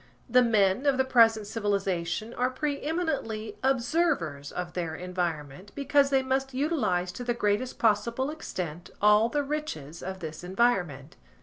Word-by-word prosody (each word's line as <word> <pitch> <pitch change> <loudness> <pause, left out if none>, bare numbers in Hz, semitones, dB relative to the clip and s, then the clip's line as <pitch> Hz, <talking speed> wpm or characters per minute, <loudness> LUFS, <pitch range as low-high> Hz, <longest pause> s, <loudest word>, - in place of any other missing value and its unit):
The 250 0 +5
men 220 +2 +2
of 275 -2 +3
the 265 - +2
present 225 -4 +4
civilisation 200 -1 -2
are 250 +1 0
pre 285 +2 -3
eminently 280 -10 -3
observers 245 - 0
of 180 -1 -5
their 165 -3 -3
environment 175 -1 -4
because 285 0 +3
they 270 -1 +2
must 265 0 -1
utilise 215 - 0
to 205 +7 -7
the 240 -1 -1
greatest 210 +3 0
possible 235 +5 +1
extent 175 - -6
all 210 +2 +5
the 290 +3 0
riches 275 - -5
of 190 0 -5
this 155 -1 -7
environment. 180 - 0
220 Hz, 145 wpm, -28 LUFS, 180-265 Hz, -, The